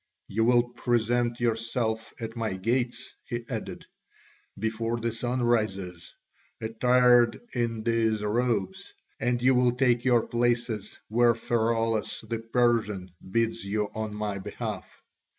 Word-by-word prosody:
"You 110 +3 +1
will 120 0 +5
present 120 0 0
yourselves 115 -1 -1
at 115 0 -5
my 110 -4 -2
gates," 120 +4 -1
he 120 -1 -4
added, - - -5 0.7
"before 115 +2 -2
the 115 0 -1
sun 120 +2 -2
rises, 95 -7 -1 0.4
attired 120 +1 +4
in 115 -3 -1
these 110 -2 +1
robes, 105 -3 -1 0.2
and 120 0 +1
you 130 +1 +5
will 125 -1 +3
take 125 -2 +2
your 120 -3 +3
places 120 -3 -1
where 120 +1 +4
Pheraulas 115 -1 0
the 115 0 -2
Persian 115 -5 +1 0.2
bids 115 +2 0
you 105 +1 -1
on 110 -1 -4
my 105 -2 -3
behalf. 105 +1 -5
115 Hz, 125 wpm, -27 LUFS, 110-120 Hz, 0.7 s, will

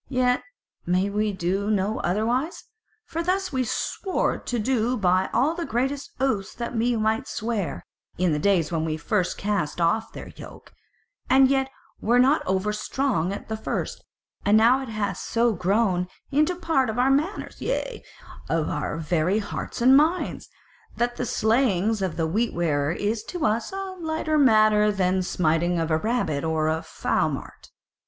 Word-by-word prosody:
Yet 250 -1 +2 0.4
may 185 +3 +1
we 210 +1 0
do 190 +2 -1
no 205 0 0
otherwise; 235 - -1 0.4
for 330 - -3
thus 365 0 -1
we 260 -1 +1
swore 375 - -1
to 245 - -3
do 245 +1 0
by 185 -2 +2
all 280 +6 +2
the 340 0 -4
greatest 270 +1 -2
oaths 240 -8 -1
that 235 0 -5
we 235 +2 +1
might 220 0 0
swear, 220 -5 -3 0.3
in 180 -1 +2
the 150 - 0
days 175 -3 +2
when 160 -2 0
we 155 -1 -2
first 185 +3 -1
cast 195 -7 -2
off 195 +7 +1
their - - -9
yoke, - - -12 0.6
and 265 0 +6
yet 270 -1 +1 0.3
were 235 +3 +3
not 265 +5 +4
over 190 +3 0
strong 215 - -1
at 200 - -6
the 220 - -3
first; 220 - -4 0.4
and 205 +1 +5
now 240 +4 +5
it 265 - -7
hath 215 -2 -2
so 235 0 +1
grown 185 -1 +1 0.2
into 305 +5 +3
a 350 - -11
part 270 -8 +1
of 220 - -3
our 255 +2 +3
manners, 305 +9 -1
yea, - - -3 0.5
and 165 - +2
of 155 - -2
our 150 +1 -3
very 165 +4 +1
hearts 220 +3 -5
and 260 +2 +7
minds, 320 +6 +1 0.5
that 240 0 0
the 250 - -2
slaying 220 -4 +2
of 185 -3 -2
a 165 - +2
Wheat 220 +9 0
wearer 150 -4 +1
is 210 +5 -1
to 355 -4 -3
us 220 +2 0
a 385 -1 -5
lighter 315 -2 0
matter 215 -5 +5
than 190 -2 +1
the - - +1
smiting 175 0 +1
of 165 0 -1
a 155 - +3
rabbit 215 -9 -1
or 160 -1 0
a 160 +1 0
fowmart. - - -3
215 Hz, 175 wpm, -25 LUFS, 180-260 Hz, 0.6 s, and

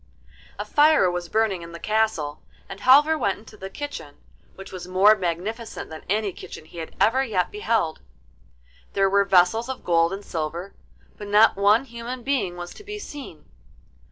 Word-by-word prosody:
A - - -4
fire 295 - +4
was 175 -1 -4
burning 215 -5 +1
in 170 0 -10
the 170 - -8
castle, 215 -10 -1 0.3
and 195 - -9
Halvor 295 +5 +5
went 200 -7 0
into 220 0 -15
the 190 -2 -8
kitchen, 285 - -7 0.4
which 195 - -11
was 180 -1 -8
more 195 +4 +5
magnificent 195 +4 -4
than 160 - -8
any 205 -1 0
kitchen 155 - -10
he 170 +2 -11
had 160 - -7
ever 260 +5 +3
yet 200 -8 -1
beheld. 230 - -1 0.9
There 195 -1 +2
were 200 0 +4
vessels 195 +6 +3
of 265 - -5
gold 165 -1 +3
and 195 +1 -6
silver, 170 +3 -4 0.5
but 205 - -7
not 210 +2 +5
one 205 +5 +4
human 235 0 -7
being 215 -11 -1
was 175 0 -7
to - - -13
be 415 +1 -7
seen. 285 - -9
200 Hz, 175 wpm, -24 LUFS, 175-235 Hz, 0.9 s, Halvor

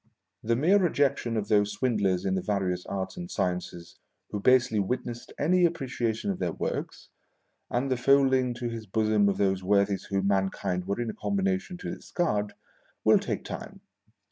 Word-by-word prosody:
The 115 +1 +1
mere 175 +11 +4
rejection 140 - +1
of 105 -1 -2
those 105 -1 +2
swindlers 100 -8 0
in 95 - +1
the 95 - 0
various 95 -3 -1
arts 95 - -4
and 175 0 -6
sciences 90 - -3 0.3
who 105 - -2
basely 120 -1 +4
witnessed 120 +3 -3
any 180 +5 +3
apprecia 130 -9 0
tion 200 - -2
of 190 - -5
their 85 - -1
works, - - -4 0.6
and 130 +3 -1
the 130 - +2
folding 130 -1 +3
to 120 0 -4
his 115 -2 -6
bosom 105 0 +2
of 100 - -1
those 95 -1 +1
worthies 100 0 +2
whom 95 -1 -1
mankind 95 -2 0
were 100 +3 -1
in 120 -2 -1
a - - -12
combination 190 -2 -1
to - - -5
discard, 105 - -2 0.5
will - - +6
take - - -3
time. - - -7
110 Hz, 170 wpm, -28 LUFS, 100-135 Hz, 0.6 s, will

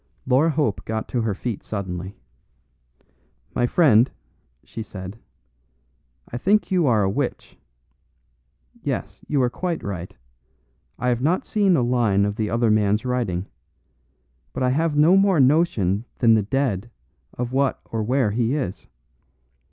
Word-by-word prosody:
Laura 135 +5 +3
Hope 145 -9 0
got 110 0 -3
to 120 - -1
her 110 -3 -1
feet 115 0 -4
suddenly. 95 -2 -5 1.4
"My 120 - +1
friend," 125 -7 +4 0.5
she 115 - -8
said, 100 0 -8 1.1
"I 120 - -5
think 210 - +2
you 180 -5 +3
are 110 -4 +3
a - - +2
witch. 125 +7 -3 1.3
Yes, - - -4
you 145 - 0
are 125 - +2
quite 175 +2 -3
right. 90 -7 -6 0.8
I 125 +1 -1
have 120 -1 0
not 165 +7 +1
seen 200 -4 +2
a 130 - +2
line 115 -5 +2
of 100 0 -2
the 105 -1 -2
other 115 -1 +2
man's 105 +1 +2
writing; 115 -8 -1 1.1
and 130 - 0
I - - +2
have 155 +2 0
no 160 +5 +6
more 195 -4 +4
notion 125 - +2
than 115 -2 +5
the 110 - +4
dead 120 -2 -1 0.5
of 125 0 -3
what 135 0 +1
or 115 - -1
where 125 0 +1
he 120 +4 0
is. 115 -11 -4
120 Hz, 145 wpm, -23 LUFS, 105-140 Hz, 1.4 s, no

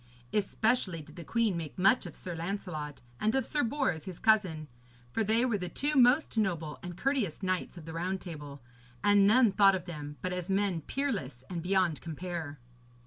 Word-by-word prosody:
Especially 210 -4 +1
did - - -15
the 170 - -8
queen 225 +2 +1
make 160 -3 -5
much 195 +2 +4
of 170 - -10
Sir 180 - -5
Lancelot 165 -5 -5 0.2
and 215 +3 +1
of 265 - +1
Sir 295 - 0
Bors 240 - 0
his 185 -3 -7
cousin, 190 -9 +2 0.4
for 225 - +1
they 225 +4 +3
were 225 -5 0
the 180 -1 -3
two 290 +2 -1
most 255 -2 +4
noble 165 -7 -1
and 175 -2 -7
courteous 245 - -1
knights 185 -1 -1
of 165 - -9
the 160 - -7
Round 185 +3 -2
Table, 145 -7 -9 0.4
and 205 -1 +6
none 230 0 +6
thought 195 0 +6
of 180 -2 -4
them 150 -4 -7
but 185 0 -1
as 180 0 -4
men 195 -3 +1
peerless 145 - -3
and 170 -2 -3
beyond 180 -3 +1
compare. 165 -2 -5
185 Hz, 190 wpm, -31 LUFS, 165-220 Hz, 0.4 s, and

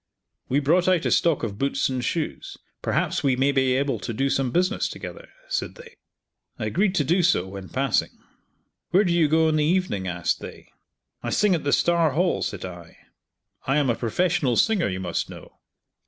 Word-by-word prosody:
We 135 - +2
brought 170 +6 +2
out 185 -3 +2
a - - +1
stock 165 -7 +2
of 105 -2 -4
boots 140 0 0
and 130 -2 -3
shoes, 160 +4 -3 0.2
perhaps - - 0
we 135 -2 +3
may 135 +2 +2
be 130 -2 +2
able 140 +1 0
to - - -5
do 135 +3 0
some 135 -2 +1
business 185 - 0
together," - - -9 0.2
said - - -3
they. 480 -1 -13 0.6
I - - -3
agreed 195 +1 +1
to 150 - +2
do 175 +7 +2
so 170 - +2
when 95 -1 -8
passing. 135 -2 0 0.8
"Where 190 +4 +4
do 175 -4 +1
you 170 -3 +3
go 160 +2 +3
in 155 -1 +2
the 150 - +2
evening?" 155 - 0
asked 85 -1 -1
they. - - -11 0.5
"I - - -4
sing 210 -2 +3
at 165 - -1
the 145 - 0
Star 170 -3 +3
Hall," 175 +4 +1
said 105 -4 -4
I, 85 -2 -10 0.7
"I 135 +2 +2
am 140 -4 +2
a - - -1
professional 135 +2 0
singer, 220 -5 +2
you 95 -1 -3
must 90 -2 -3
know." - - -12
145 Hz, 200 wpm, -24 LUFS, 125-175 Hz, 0.8 s, Where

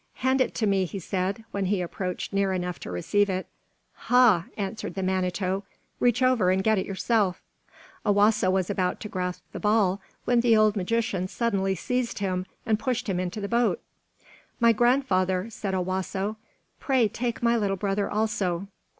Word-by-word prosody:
"Hand 260 +1 +1
it - - 0
to 220 - 0
me," 195 -2 +2
he 190 - -6
said, 190 +3 -2
when 200 -1 -1
he 200 +2 +1
had 180 - -1
approached 180 +2 -4
near 195 -1 +1
enough 180 -4 -3
to - - -8
receive 200 - +1
it. 185 0 -2 0.6
"Ha!" 240 -9 +5
answered 200 +1 -4
the 190 - -2
Manito, 185 +1 -1 0.4
"reach 245 +1 +2
over 255 -8 +3
and 190 +1 +2
get 220 -1 +3
it - - -3
yourself." 195 -1 0 0.6
Owasso 205 -1 +3
was 185 -1 +1
about 185 -3 -1
to - - -5
grasp 180 -2 -3
the - - -6
ball, 210 -3 +2 0.2
when 245 -1 +3
the 230 -2 +4
old 215 0 +4
magician 205 -1 -1
suddenly 195 -3 0
seized 250 +6 -2
him 185 -2 -2 0.2
and 220 -2 +1
pushed 250 0 -2
him 185 -3 0
into 185 +3 -3
the 200 - -3
boat. 235 - +1 0.8
"My 235 -1 +6
grandfather," 220 -5 +2
said 195 -3 -3
Owasso, 190 +3 -2 0.4
"pray 260 -5 +2
take 235 +2 -3
my 235 0 +4
little 200 -4 0
brother 200 +1 -1
also. 200 -4 -1
200 Hz, 175 wpm, -26 LUFS, 185-225 Hz, 0.8 s, My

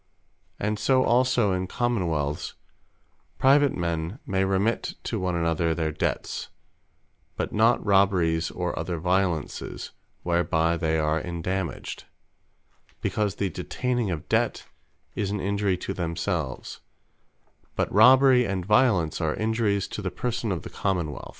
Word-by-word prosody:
And 105 +1 -1
so 130 -1 +3
also 125 -4 +3
in 95 0 -2
Common 120 -4 0
wealths, 75 -2 -2 0.8
private 140 +1 +4
men 85 +3 -2
may 95 -1 0
remit 95 +4 0
to 110 - -2
one 90 -1 -1
another 85 0 +1
their 80 -2 -1
debts; 75 - -3 0.9
but - - -3
not 115 +2 +3
robberies 90 -5 +3
or 90 -1 -3
other 85 +1 -3
violences, 90 -1 -1 0.3
whereby 85 -1 +1
they 80 -1 0
are 75 0 +1
endammaged; 90 +1 -4 0.9
because 105 -2 -1
the 100 -3 -2
detaining 125 +4 -2
of 80 -4 -4
Debt, - - 0 0.5
is 100 - -2
an 105 0 -2
Injury 100 -1 0
to 95 - -4
themselves; 85 -5 -3 0.9
but - - -1
Robbery 130 +4 +7
and 95 -2 -2
Violence, 105 -7 +3
are 80 -1 0
Injuries 110 -3 0
to - - -5
the 95 - -2
Person 115 +2 -3
of 85 -4 -3
the - - -9
Common 90 -6 -1
wealth. - - -9
95 Hz, 135 wpm, -26 LUFS, 85-105 Hz, 0.9 s, Robbery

